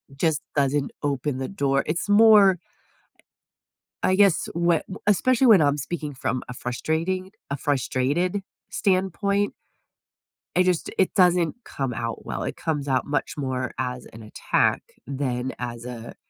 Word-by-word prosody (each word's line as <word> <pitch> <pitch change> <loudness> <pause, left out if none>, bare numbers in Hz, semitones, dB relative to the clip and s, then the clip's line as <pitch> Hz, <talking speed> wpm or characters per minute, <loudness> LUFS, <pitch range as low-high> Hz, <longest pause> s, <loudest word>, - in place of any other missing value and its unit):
Just 155 0 0
doesn't 140 0 +1
open 140 -1 -1
the 130 0 -4
door, 140 -8 0
it's 165 +5 -2
more 205 -3 +7 1.4
I 185 - +3
guess, 195 -3 +3
whe 170 -1 +2
wh 190 - -6
especially 250 +6 +3
when 210 -6 +8
I'm 145 -1 +3
speaking 150 +1 -5
from 125 -1 -2
a 125 - -6
frustrating 165 +10 -2 0.2
a 140 - -1
frustrated 145 +7 0 0.3
standpoint 200 +1 0 1.0
I 180 - +5
just 180 -3 0
it 190 - +2
doesn't 180 -4 +3
come 135 -3 -3
out 115 0 -5
well, - - -4
it - - -4
comes 150 -3 -2
out 130 -2 +1
much 145 - -2
more 130 -2 -2
as 125 -1 -4
an 110 0 -11
attack 105 - 0 0.2
than 130 -1 -3
as 120 -1 -5
a, 120 -2 -8
150 Hz, 145 wpm, -24 LUFS, 130-185 Hz, 1.4 s, when